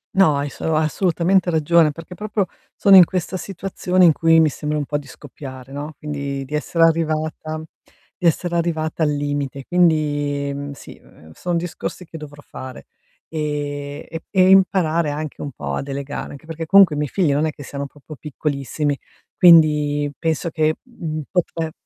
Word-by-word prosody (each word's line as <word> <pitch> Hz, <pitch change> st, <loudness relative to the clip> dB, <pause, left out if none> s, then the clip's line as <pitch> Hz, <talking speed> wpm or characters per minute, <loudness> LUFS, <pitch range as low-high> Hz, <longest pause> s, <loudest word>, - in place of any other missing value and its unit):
No, 185 Hz, -7 st, +5 dB
hai 145 Hz, +1 st, -1 dB
asso 155 Hz, +3 st, -2 dB
assolutamente 175 Hz, +3 st, +1 dB
ragione, 160 Hz, -1 st, +3 dB
perché 165 Hz, +3 st, -10 dB
proprio 210 Hz, -1 st, -2 dB, 0.3 s
sono 195 Hz, -1 st, +7 dB
in 180 Hz, -, +10 dB
questa 185 Hz, +1 st, -3 dB
situazione 185 Hz, 0 st, -1 dB
in 165 Hz, -, +8 dB
cui 165 Hz, +1 st, +4 dB
mi 155 Hz, -, +4 dB
sembra 150 Hz, +2 st, -3 dB
un 145 Hz, -, -1 dB
po' 145 Hz, +1 st, -2 dB
di 145 Hz, -1 st, -9 dB
scoppiare, 130 Hz, -1 st, -11 dB
no, 145 Hz, +2 st, -6 dB
quindi 140 Hz, -2 st, -4 dB
di 140 Hz, +3 st, -10 dB
essere 165 Hz, +2 st, +1 dB
arrivata 155 Hz, -1 st, 0 dB, 0.5 s
di 175 Hz, -, +1 dB
essere 170 Hz, +2 st, 0 dB
arrivata 160 Hz, -1 st, -1 dB
al 150 Hz, -, +2 dB
limite. 145 Hz, -2 st, -2 dB
Quindi, 145 Hz, -5 st, +1 dB
mhmm, 140 Hz, 0 st, -5 dB
sì, -, -, -12 dB
ehm, 80 Hz, +1 st, -18 dB
son 175 Hz, -, -3 dB
discorsi 175 Hz, +1 st, -4 dB
che 160 Hz, -, -10 dB
dovrò 145 Hz, -1 st, -11 dB
fare, 130 Hz, -, -10 dB, 0.4 s
ehm, 145 Hz, -1 st, -4 dB
e 165 Hz, -, -5 dB
p -, -, -34 dB
e 185 Hz, -1 st, +4 dB
imparare 170 Hz, -5 st, +3 dB
anche 155 Hz, 0 st, -5 dB
un 145 Hz, -, -5 dB
po' 70 Hz, -, -5 dB
a -, -, -2 dB
delegare, 140 Hz, +1 st, -5 dB
anche 145 Hz, +3 st, -12 dB
perché 165 Hz, 0 st, -5 dB
comunque 195 Hz, -3 st, +6 dB
i -, -, -4 dB
miei 150 Hz, -3 st, -1 dB
figli 175 Hz, -7 st, +1 dB
non 150 Hz, +3 st, +1 dB
è 155 Hz, -, -1 dB
che 145 Hz, -, -11 dB
siano 140 Hz, 0 st, -5 dB
proprio 145 Hz, +2 st, -13 dB
piccolissimi, 145 Hz, 0 st, -2 dB, 0.4 s
quindi 150 Hz, -4 st, +5 dB
penso 165 Hz, 0 st, -1 dB
che, 155 Hz, -1 st, +1 dB
mhmm, 160 Hz, -11 st, -5 dB
potre 165 Hz, -3 st, -1 dB
155 Hz, 180 wpm, -21 LUFS, 145-170 Hz, 0.5 s, in